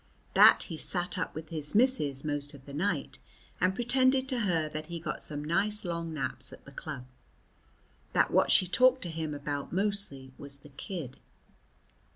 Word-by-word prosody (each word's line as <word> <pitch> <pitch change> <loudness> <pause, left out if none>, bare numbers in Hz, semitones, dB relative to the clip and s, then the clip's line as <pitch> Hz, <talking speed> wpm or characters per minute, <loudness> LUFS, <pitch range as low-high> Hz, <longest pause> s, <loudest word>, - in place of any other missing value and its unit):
That - - +7
he 165 - -7
sat 175 +2 +1
up 170 - -4
with 155 0 -7
his 155 -1 +2
missus 205 - +2
most 145 -1 -3
of 135 -1 -16
the 140 - -11
night, 185 +8 -2 0.4
and 185 +1 +1
pretended 260 +2 +3
to 255 - -1
her 170 -8 0
that 155 0 -6
he 170 -1 -6
got 160 -1 -4
some 145 -1 -1
nice 205 +6 +2
long 170 -1 -4
naps 135 -4 -2
at - - -14
the 140 - -13
club. 140 -2 -7 1.1
That - - +2
what - - +3
she 185 - +5
talked 255 +7 +3
to 175 - -2
him 160 -2 -4
about 145 0 -5
mostly 190 -9 -1
was 140 0 -2
the 145 +1 -16
kid. 140 -2 -7
165 Hz, 180 wpm, -29 LUFS, 145-200 Hz, 1.1 s, That